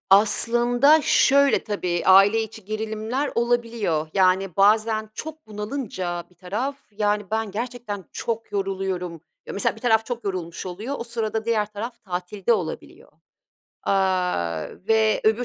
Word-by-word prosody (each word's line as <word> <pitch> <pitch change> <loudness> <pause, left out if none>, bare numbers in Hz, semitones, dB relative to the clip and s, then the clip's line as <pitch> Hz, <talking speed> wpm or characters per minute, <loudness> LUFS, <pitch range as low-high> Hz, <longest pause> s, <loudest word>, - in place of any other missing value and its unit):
Aslında 240 +8 +5
şöyle: 280 0 +4
Tabii, 180 -5 -2
aile 195 +4 +6
içi 220 -1 -9
gerilimler 220 +6 -3
olabiliyor. 230 -9 0
Yani 190 -2 +2
bazen 215 +2 +3
çok 315 -2 -8
bunalınca 210 -6 -4
bir 180 - -24
taraf, 210 +11 -3
yani 210 0 0
ben 220 -1 -1
gerçekten 230 -2 -5
çok 225 -2 -4
yoruluyorum 190 -4 -3 0.3
Ya, - - -6
mesela 200 - 0
bir - - -13
taraf 225 -2 +2
çok 240 -2 -5
yorulmuş 180 -3 -4
oluyor, 210 +10 -5
o - - -4
sırada 225 -2 -3
diğer 220 -2 +1
taraf 230 +3 -6
tatilde 185 +4 -1
olabiliyor, 180 -7 -4 0.7
aaa, 180 - 0 0.2
ve 220 -1 +3
öbür 220 +3 +3
215 Hz, 130 wpm, -24 LUFS, 190-230 Hz, 0.7 s, aile